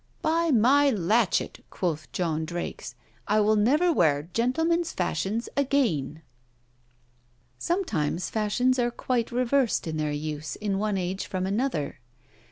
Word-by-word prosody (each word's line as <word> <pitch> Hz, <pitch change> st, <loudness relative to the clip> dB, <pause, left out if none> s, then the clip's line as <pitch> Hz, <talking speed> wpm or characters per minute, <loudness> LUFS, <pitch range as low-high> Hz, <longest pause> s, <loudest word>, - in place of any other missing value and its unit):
'By 330 Hz, +1 st, +2 dB
my 275 Hz, +3 st, +5 dB
latchet!' 210 Hz, -1 st, +1 dB
quoth 160 Hz, -4 st, -3 dB
John 160 Hz, -3 st, -1 dB
Drakes, 165 Hz, -7 st, -5 dB, 0.3 s
'I 215 Hz, +1 st, +3 dB
will 215 Hz, +1 st, +3 dB
never 295 Hz, +12 st, +3 dB
wear 145 Hz, -, +2 dB
gentlemen's 325 Hz, +8 st, +1 dB
fashions 190 Hz, +6 st, -2 dB
again!' 220 Hz, -, 0 dB, 1.4 s
Sometimes 185 Hz, -, -1 dB
fashions 245 Hz, +4 st, +1 dB
are 240 Hz, 0 st, +2 dB
quite 240 Hz, 0 st, -2 dB
reversed 250 Hz, 0 st, +1 dB
in 160 Hz, -1 st, -3 dB
their 150 Hz, -1 st, -1 dB
use 150 Hz, 0 st, -4 dB
in 200 Hz, -2 st, -2 dB
one 210 Hz, -1 st, 0 dB
age 185 Hz, +1 st, -3 dB
from 185 Hz, -1 st, -2 dB
another. 200 Hz, -, -2 dB
210 Hz, 125 wpm, -26 LUFS, 165-255 Hz, 1.4 s, my